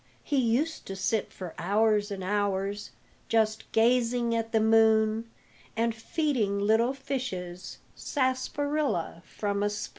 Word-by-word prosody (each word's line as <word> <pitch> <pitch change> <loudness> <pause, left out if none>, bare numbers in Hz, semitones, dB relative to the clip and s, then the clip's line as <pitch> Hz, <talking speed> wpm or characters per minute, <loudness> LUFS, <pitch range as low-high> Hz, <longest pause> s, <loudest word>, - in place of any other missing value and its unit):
He 290 - -1
used 260 +7 0
to 195 - -5
sit 200 +3 -1
for 180 -3 -8
hours 210 +3 +2
and 195 -2 -5
hours 200 +1 -1 0.4
Just 220 -1 +1
gazing 235 0 +2
at 225 0 -1
the 225 - +3
moon, 220 0 +3 0.5
And 230 0 +1
feeding 225 -3 -1
little 220 +5 +3
fishes 230 -10 -5 0.2
Sarsaparilla 265 - -1
from 200 0 -3
a 205 - +2
spoon. 210 0 -5
220 Hz, 125 wpm, -28 LUFS, 205-245 Hz, 0.5 s, the